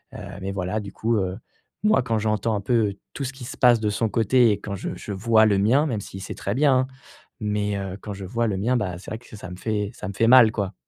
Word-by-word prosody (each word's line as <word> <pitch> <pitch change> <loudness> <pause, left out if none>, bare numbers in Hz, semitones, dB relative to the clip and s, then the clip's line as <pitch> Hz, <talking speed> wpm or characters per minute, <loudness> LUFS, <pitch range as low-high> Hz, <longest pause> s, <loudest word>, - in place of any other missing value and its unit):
heu, - - -7 0.2
mais 95 +1 -3
voilà, 95 +2 -2
du 100 -1 -7
coup, 115 +2 0
heu, 95 0 -2 0.5
moi, 215 -8 +4
quand 115 -2 0
j'entends 110 +1 0
un 100 - -2
peu 105 -2 +1 0.2
tout 140 - -4
ce 135 - -3
qui 130 -2 -11
se - - -7
passe 120 -2 +5
de 105 -1 0
son 110 +2 0
côté 115 +2 +4
et 100 - -1
quand 100 -1 -6
je - - -5
je 105 - -8
vois 110 +2 +4
le 100 -2 +3
mien 130 +9 +3
même 110 -6 -2
si 95 - -9
c'est 95 - -6
très 100 - -3
bien, 140 -1 +4
hein, 130 - 0 0.5
mais 105 -1 -1
heu, 95 0 -5
quand 105 - -6
je 95 -1 -7
vois 115 +4 -1
le 95 -3 -1
mien, 120 +6 +1
bah, 90 -5 -2
c'est - - -10
vrai 110 - -4
que 120 - -13
ça 95 -2 -9
me - - -6
fait 105 -1 -2
ça - - -7
me 100 - -5
fait 115 +3 +2
mal, 120 -3 +8
quoi. 100 -3 -3
105 Hz, 280 wpm, -24 LUFS, 100-115 Hz, 0.5 s, mal